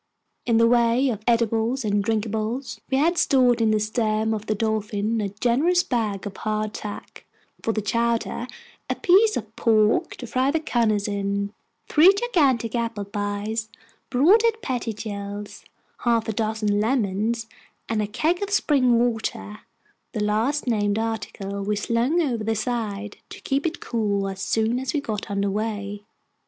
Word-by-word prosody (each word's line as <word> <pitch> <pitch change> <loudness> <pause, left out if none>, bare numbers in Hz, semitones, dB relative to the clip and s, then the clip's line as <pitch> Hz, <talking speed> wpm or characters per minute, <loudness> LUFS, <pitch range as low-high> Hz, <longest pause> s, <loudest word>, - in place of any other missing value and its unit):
In 230 -2 +3
the 230 - +5
way 240 +2 +3
of 215 -4 -3
eatables 230 +2 +1
and 205 -1 +1
drinkables, 220 +4 -2
we 265 - +1
had 335 +5 +2
stored 250 -3 +4
in 225 - +3
the 215 0 +3
stem 215 0 0
of 215 0 -5
the 215 - +1
Dolphin 215 0 -1
a 200 - -2
generous 255 - +2
bag 220 - -2
of 200 -2 -6
hard 215 0 -2
tack 210 -1 -8 0.3
(for 225 - 0
the 215 -1 -2
chowder), 235 +3 0 0.4
a - - 0
piece 410 +4 +4
of 225 -1 -7
pork 220 -2 +2
to 250 - -8
fry 255 +3 +1
the 320 +3 +1
cunners 225 -8 +1
in, 200 0 -2 0.3
three 325 +5 +7
gigantic 285 - +1
apple 230 -4 -2
pies 205 +2 -3 0.4
(bought 330 - +5
at 450 -2 +1
Pettingil's), 210 - -5 0.3
half 230 -2 +1
a 220 - -1
dozen 215 -1 0
lemons, 220 -1 0 0.4
and 220 -1 0
a 210 - -1
keg 320 - 0
of 405 - -2
spring 270 - +3
water 225 -3 -2 0.5
the 215 -3 -1
last 225 +8 0
named 205 -4 +1
article 210 -3 -3
we 210 +1 0
slung 235 +9 +1
over 240 -7 -1
the 225 +1 0
side, 215 -3 -3
to - - -9
keep 280 +4 0
it 335 +2 -5
cool, 205 -4 -1
as 190 -1 -5
soon 225 +4 +1
as 265 +3 -3
we - - +2
got 220 -6 -4
under 200 0 0
way. 205 -1 -3
225 Hz, 160 wpm, -24 LUFS, 210-245 Hz, 0.5 s, three